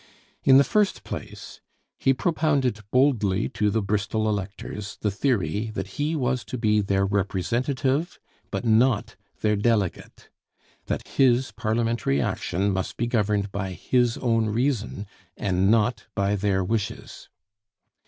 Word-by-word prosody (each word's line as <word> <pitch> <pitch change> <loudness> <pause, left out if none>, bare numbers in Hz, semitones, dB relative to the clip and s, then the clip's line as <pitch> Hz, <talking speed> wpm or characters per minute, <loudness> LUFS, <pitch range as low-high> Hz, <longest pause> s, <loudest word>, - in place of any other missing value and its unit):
In 135 -1 +7
the 140 - +7
first 210 +4 +1
place, - - -8 0.4
he 135 - +3
propounded 140 - +1
boldly 110 -7 +2
to 105 0 0
the 110 +1 0
Bristol 105 +2 -1
electors 105 0 -4
the 105 - +1
theory 105 - 0
that 145 - -5
he 155 +3 0
was 130 -4 0
to 115 +6 -5
be 105 -2 +2
their 95 -1 +1
representative 125 - -1 0.3
but - - -4
not 115 0 +2 0.3
their 105 -1 +2
delegate; 105 -3 -1 0.6
that - - -3
his 130 -1 +2
parliamentary 115 - 0
action 95 +7 -1
must 95 0 -3
be 120 - 0
governed 105 -4 0
by 95 -2 -3
his 120 +4 +1
own 115 -3 +1
reason 115 -3 -1 0.3
and 95 0 +1
not 115 +2 +2
by 100 0 +1
their 95 -1 +1
wishes. 105 +2 -4
110 Hz, 135 wpm, -25 LUFS, 100-125 Hz, 0.6 s, In